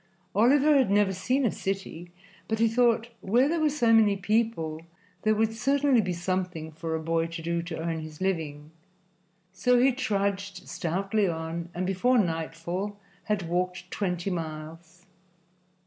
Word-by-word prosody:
Oliver 275 +8 +5
had 265 -6 +4
never 200 -1 +3
seen 255 +8 0
a 225 - +2
city, 190 -3 -4 0.4
but 220 - 0
he 230 +1 +4
thought 235 0 +2
where 240 +8 +3
there 335 +2 0
were 310 -1 +3
so 240 -6 +2
many 210 -3 +5
people 190 -6 0 0.4
there 215 0 +2
would 220 +1 +1
certainly 270 +1 +3
be 185 -3 -2
something 180 -2 -3
for 160 +1 -4
a - - -1
boy 165 +1 0
to 165 0 -7
do 170 0 -1
to 170 -1 -6
earn 165 0 -2
his 155 -1 -9
living, 155 -5 -2 0.8
so 245 +7 +3
he 265 +2 +5
trudged 200 -6 -2
stoutly 195 +4 0
on 165 0 -4
and 180 +1 -1
before 195 +7 +2
nightfall 170 +2 -2 0.3
had 205 -5 -1
walked 180 +1 -2
twenty 180 -1 -2
miles. 165 +1 -7
190 Hz, 155 wpm, -27 LUFS, 165-225 Hz, 0.8 s, Oliver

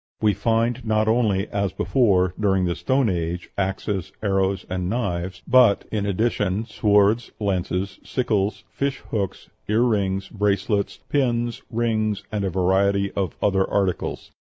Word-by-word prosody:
We 105 -1 +3
find 115 +3 0
not 110 -1 +1
only, 110 -4 +2
as 100 -1 -1
before, 95 -9 +2
during 95 -3 +2
the 85 - 0
Stone 130 +6 +1
Age, 85 -1 -2
axes, 95 -1 -2
arrows, 95 -2 +1
and 90 -1 -2
knives, 90 -5 -3
but, 125 -5 +5
in 105 -2 -1
addition, 100 0 0
swords, 105 +1 +2
lances, 95 -1 -2
sickles, 105 -5 -1
fish 140 -1 -2
hooks, 100 -4 -3 0.2
ear 110 +3 +3
rings, 100 -5 0
bracelets, 100 0 0
pins, 120 -4 0
rings, 110 -3 0
and 105 -2 -1
a 95 - 0
variety 95 +2 +2
of 95 -6 -2
other 95 -1 +2
articles." 95 -3 -1
100 Hz, 135 wpm, -23 LUFS, 95-110 Hz, 0.2 s, but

